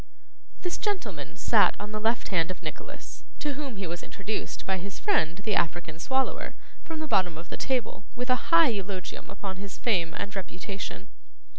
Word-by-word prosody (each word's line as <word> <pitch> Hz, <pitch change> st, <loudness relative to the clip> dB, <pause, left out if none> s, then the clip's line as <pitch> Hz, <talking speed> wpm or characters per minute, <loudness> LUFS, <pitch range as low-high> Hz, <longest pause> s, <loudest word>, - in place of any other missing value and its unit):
This 355 Hz, -1 st, -1 dB
gentleman 410 Hz, -3 st, -2 dB
sat -, -, +5 dB
on 205 Hz, +1 st, -4 dB
the 215 Hz, -, -1 dB
left 225 Hz, +2 st, +2 dB
hand 170 Hz, -3 st, +3 dB
of 185 Hz, -, -5 dB
Nicholas, -, -, -7 dB
to 295 Hz, -1 st, -1 dB
whom 275 Hz, -3 st, -4 dB
he 195 Hz, -, -2 dB
was 170 Hz, +1 st, -3 dB
introduced 205 Hz, +2 st, -3 dB
by 190 Hz, -1 st, +1 dB
his 195 Hz, +2 st, -6 dB
friend 175 Hz, -, +3 dB
the 215 Hz, -1 st, +1 dB
African 165 Hz, -2 st, +1 dB
Swallower, 265 Hz, +7 st, 0 dB, 0.3 s
from 320 Hz, -1 st, -4 dB
the 315 Hz, -, -2 dB
bottom 180 Hz, -, +3 dB
of 165 Hz, +2 st, -8 dB
the -, -, -3 dB
table, 250 Hz, -6 st, -1 dB
with 250 Hz, +1 st, 0 dB
a 255 Hz, -, +1 dB
high 330 Hz, -3 st, +8 dB
eulogium 195 Hz, -4 st, -3 dB
upon 195 Hz, -2 st, -4 dB
his 195 Hz, 0 st, -6 dB
fame 175 Hz, -8 st, +2 dB
and 200 Hz, 0 st, -3 dB
reputation. 195 Hz, +1 st, -4 dB
200 Hz, 180 wpm, -29 LUFS, 185-255 Hz, 0.3 s, high